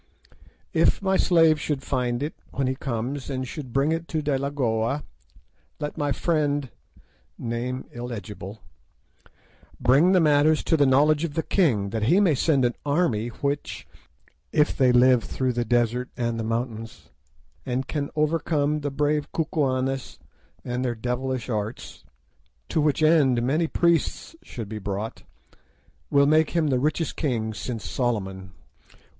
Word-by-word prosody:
If - - +3
my 190 0 +2
slave 165 -5 +4
should 145 -3 -2
find 125 -2 -1
it 150 - -3 0.2
when 135 - -2
he 130 - 0
comes, 130 +1 -4
and 130 -1 -3
should 135 -2 -7
bring 135 +5 +2
it 165 +1 -2
to 155 -1 -2
Delagoa, 140 -2 0 0.8
let 150 -1 -4
my 145 -2 -1
friend 145 -3 0 0.7
(name 120 +2 -3
illegible) 105 -4 -7 1.2
bring 135 +9 +4
the 185 - +5
matter 150 -1 +4
to 160 - 0
the 145 -3 +4
knowledge 145 +4 +4
of 155 -3 -3
the 160 - 0
king, 115 - +1
that 110 -1 -1
he 180 +5 +5
may 190 -6 +4
send 140 -1 +2
an 120 - +1
army 140 -7 +1
which, 140 +4 -4 0.6
if 150 -1 +2
they 130 -2 +4
live 125 -1 +5
through 130 -1 -1
the 120 0 0
desert 120 +1 +1
and 120 -1 -1
the - - -2
mountains, 115 0 -4 0.5
and 130 +1 -2
can 145 -2 -2
overcome 150 -1 +1
the 145 -1 -2
brave 145 +1 0
Kukuanes 135 -5 -1 0.5
and 125 +1 -2
their 120 -2 -1
devilish 125 +2 -3
arts, 110 -1 -5 0.7
to 160 - +1
which 150 0 +1
end 140 -7 +4
many 155 +7 +1
priests 170 - 0
should 115 - -7
be 110 +1 -6
brought, 100 +2 -4 0.9
will 140 0 +4
make 155 +1 +4
him 160 -3 +2
the 130 -2 +2
richest 155 +3 -1
king 115 -7 -1
since 110 -4 -5
Solomon. 95 - -2
135 Hz, 145 wpm, -25 LUFS, 120-150 Hz, 1.2 s, the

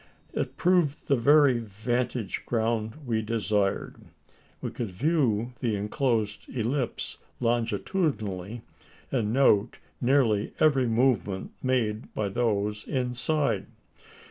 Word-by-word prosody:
It - - -3
proved 175 -5 +2
the 140 - +4
very 140 0 +5
vantage 115 +1 -2
ground 115 +4 -1
we 115 -3 0
desired. 105 -3 -1 0.6
We - - -4
could 115 -4 -4
view 120 - +1
the 115 -4 0
enclosed 105 0 -1
ellipse 125 +2 -2 0.2
longitudinally, 115 - -1 0.5
and 115 -5 0
note 115 -4 +3 0.2
nearly 120 -5 +2
every 135 -5 +4
movement 110 -6 +1
made 120 -4 0
by 105 -2 -1
those 105 -1 0
inside. 130 +3 0
115 Hz, 100 wpm, -27 LUFS, 105-130 Hz, 0.6 s, very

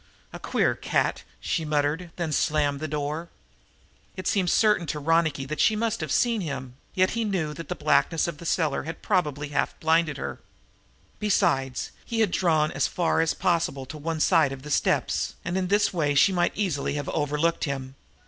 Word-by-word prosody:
"A - - -7
queer - - +1
cat!" - - 0 0.2
she 170 - -1
muttered, 150 +3 0
then 170 -3 -2
slammed 145 -1 +1
the 155 - -3
door. 150 +3 -3 0.9
It 185 - -6
seemed 185 -4 +1
certain 210 -5 +3
to 150 - -2
Ronicky 155 -2 +1
that 155 +3 -5
she 220 - +4
must 225 -2 -1
have 155 -3 -3
seen 235 +2 +2
him, 135 -6 -5 0.2
yet 185 -1 +3
he 230 0 -1
knew 180 -8 -1
that 165 -1 -9
the - - -2
blackness 155 +2 +2
of 160 -3 -5
the 170 - -9
cellar 160 -3 +1
had 165 +2 -7
probably 150 -4 0
half 145 - -1
blinded 160 -2 +2
her. - - -5 0.8
Besides, 135 -10 +1
he 230 -2 -1
had 210 -5 +2
drawn 160 -5 +2
as - - +1
far 170 -2 +1
as 165 - +1
possible 165 -6 0
to 130 +4 -8
one 160 +1 -3
side 140 - +4
of 135 -1 -8
the 150 - -7
steps, - - +1
and 180 +1 -2
in 190 -1 0
this 205 +2 +2
way 150 -5 +1
she 190 +7 +5
might 175 -1 +1
easily 165 -9 -1
have 145 -1 -3
overlooked 150 +2 0
him. 135 -2 -4
160 Hz, 190 wpm, -26 LUFS, 145-180 Hz, 0.9 s, she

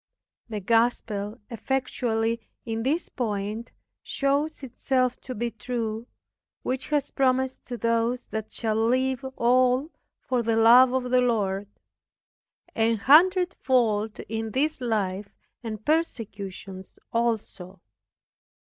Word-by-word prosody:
The 210 -2 -4
gospel 225 0 0
effectually 230 -2 -1 0.2
in 225 -1 -2
this 300 +8 0
point 215 -1 -3 0.3
shows 285 +2 -1
itself 255 0 -1
to 255 - -7
be 235 +2 -2
true, 225 0 -4 0.6
which 260 +1 -3
has 290 -2 0
promised 260 -1 +1
to 245 - -5
those 230 +2 0
that 220 -1 -4
shall 220 -1 0
leave 260 +1 +1
all 255 +4 +3 0.3
for 250 -2 -1
the 230 -1 0
love 240 +3 +7
of 250 -1 -1
the 255 0 +5
Lord, 205 -5 0 1.1
"an 225 0 +2
hundred 355 - +5
fold 220 -5 +1
in 225 +1 -4
this 295 +1 0
life, 205 -4 -1 0.3
and 215 -3 -6
persecutions 200 - -3 0.2
also." 215 -5 -2
235 Hz, 115 wpm, -26 LUFS, 220-255 Hz, 1.1 s, love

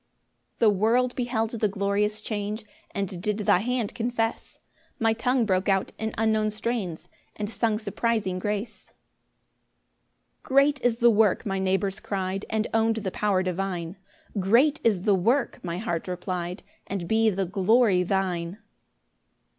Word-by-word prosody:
2 - - +4
The - - +7
world 235 +5 +2
beheld 235 -3 -1
the 220 -2 0
glorious 205 +1 0
change, 210 0 -4 0.2
And 195 -3 -4
did 210 +2 -1
thy 205 -3 +3
hand 240 0 -1
confess; 230 -1 -2 0.4
My 225 -1 +2
tongue 245 +1 +1
broke 190 -1 +1
out 195 -1 +1
in 220 0 -2
unknown 220 -1 +2
strains, 215 -6 -3 0.3
And 210 - -3
sung 225 -2 0
surprising 215 -3 -1
grace: 210 +3 -4
3 - - -27 1.5
"Great 275 +1 +3
is 240 -2 +2
the 240 -1 +5
work," 215 -3 +3
my 195 -2 -1
neighbours 190 +1 0
cry'd, 195 0 -3
And 220 0 0
own'd 225 0 +3
the 200 -4 -3
power 195 -2 +1
divine; 180 -1 -3 0.4
"Great 245 +11 +3
is 200 -6 +2
the 205 - +4
work," 235 +8 +1
my 170 -1 -3
heart 175 -5 -3
reply'd, 180 0 -4 0.2
"And 185 -3 -4
be 220 +2 +3
the 195 -1 -1
glory 200 +1 +3
thine." 180 -1 -1
210 Hz, 145 wpm, -26 LUFS, 190-225 Hz, 1.5 s, The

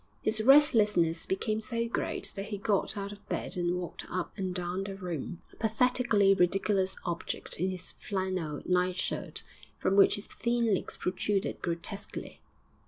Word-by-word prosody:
His 220 0 +1
restlessness 215 - +5
became 215 +3 0
so 230 0 -2
great 230 - -2
that 195 +1 -4
he 205 - -3
got 200 +1 0
out 200 0 -3
of 205 0 -13
bed - - -2
and 175 0 0
walked 180 -1 -5
up 180 0 -3
and 190 -3 -2
down 180 +1 -2
the 195 0 -5
room 175 -3 -5
a - - -15
pathetically 225 -2 +3
ridiculous 190 +1 +2
object 170 -2 -3
in 185 +3 +1
his 185 -1 -4
flannel 185 -6 -3
nightshirt, 180 0 0 0.3
from 195 - +1
which 200 - +7
his 205 - -6
thin 235 -2 +1
legs 190 - -2
protruded 190 +2 -1
grotesquely. 175 +4 -4
195 Hz, 155 wpm, -30 LUFS, 180-215 Hz, 0.3 s, which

